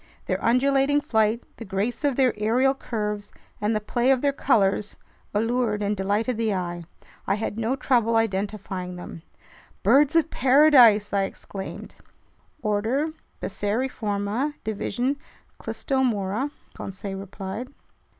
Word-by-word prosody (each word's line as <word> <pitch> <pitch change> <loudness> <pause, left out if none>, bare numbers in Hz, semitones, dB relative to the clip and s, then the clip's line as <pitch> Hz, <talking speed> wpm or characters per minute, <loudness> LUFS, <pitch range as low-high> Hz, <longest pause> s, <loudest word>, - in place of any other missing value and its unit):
Their - - -2
undulating 275 +4 +3
flight, 220 -3 +1
the - - -7
grace 205 +6 -2
of 285 -3 +2
their 260 -2 +3
aerial 235 +6 +2
curves, 210 -5 -4 0.3
and 210 +1 +1
the - - +2
play 240 +4 0
of 265 -2 +4
their 285 -1 +2
colors 205 -6 +1 0.4
allured 225 -1 0
and 205 +1 0
delighted 205 +5 0
the 220 -3 0
eye. 175 -2 -4 0.4
I - - +2
had 215 +1 -3
no 230 +4 0
trouble 235 -4 +2
identifying 195 -4 -2
them. 175 -2 -9 0.6
"Birds 295 +3 +5
of 330 -1 +3
paradise!" 250 -6 +6
I 195 -1 +2
exclaimed. 195 0 -8 0.7
"Order 230 +9 0 0.3
Passeriforma, 215 +3 -1
division 240 +5 -1 0.4
Clystomora," 245 -2 -1 0.2
Conseil 195 0 -6
replied. 195 +5 -6
220 Hz, 120 wpm, -25 LUFS, 205-260 Hz, 0.7 s, paradise